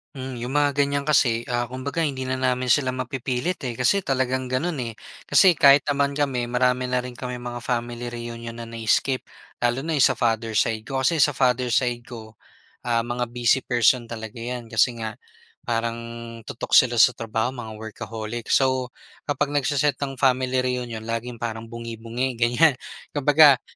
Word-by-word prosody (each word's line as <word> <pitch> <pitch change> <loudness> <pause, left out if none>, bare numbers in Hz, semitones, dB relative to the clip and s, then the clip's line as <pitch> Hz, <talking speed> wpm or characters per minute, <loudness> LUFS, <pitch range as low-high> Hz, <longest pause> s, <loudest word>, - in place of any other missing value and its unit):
Hmm, 130 0 -6
'yong 120 - -4
mga 145 +1 +2
ganyan 140 0 0
kasi, 120 -6 +2
ah, 120 -1 -2
kumbaga 130 +6 -3
hindi 135 -4 -2
na 130 - -2
namin 130 -1 0
sila 130 +2 +3
mapipilit 130 +5 -3
eh, 120 -3 -4
kasi 165 +11 +2
talagang 130 -3 -1
gano'n 145 +8 -1
eh. 115 -2 -4 0.4
Kasi 190 -2 +6
kahit 140 -2 +6
naman 140 -1 0
kami 130 -5 -1
marami 125 +1 +1
na 125 - +1
rin 125 0 -4
kaming 125 0 -6
mga 120 0 -5
family 120 0 -3
reunion 115 -1 -7
na 115 - -6
na-skip. 115 +3 0 0.4
Lalo 120 +3 0
na 165 - -1
'yong 145 -2 +5
sa 130 - -2
father 115 -1 0
side 115 -2 +1
ko, 130 +3 -2
kasi 160 +2 +3
sa 145 - +6
father 125 -2 +1
side 120 0 +1
ko, 110 -2 -9 0.5
ah, 115 -1 0
mga 120 0 -2
busy 120 +2 +2
person 120 -1 +2
talaga 110 0 -7
'yan, 120 0 -5
kasi 115 +2 +1
nga 110 -1 -4 0.5
parang 115 0 -2 0.4
tutok 115 - -7
sila 120 -2 +6
sa 125 +2 +6
trabaho, 115 +2 -2
mga 110 -4 -8
workaholic. 110 +1 -6
So, 130 -2 +2 0.4
kapag 145 0 0
nagse-set 145 +1 +1
ng 135 -1 -3
family 130 -1 +2
reunion 120 -3 -3
laging 115 +1 -4
parang 115 -1 -5
bungi-bungi 115 +2 -4
ganyan. 120 +6 +3 0.4
Kumbaga, 145 -1 +6
125 Hz, 170 wpm, -24 LUFS, 115-130 Hz, 0.5 s, Kasi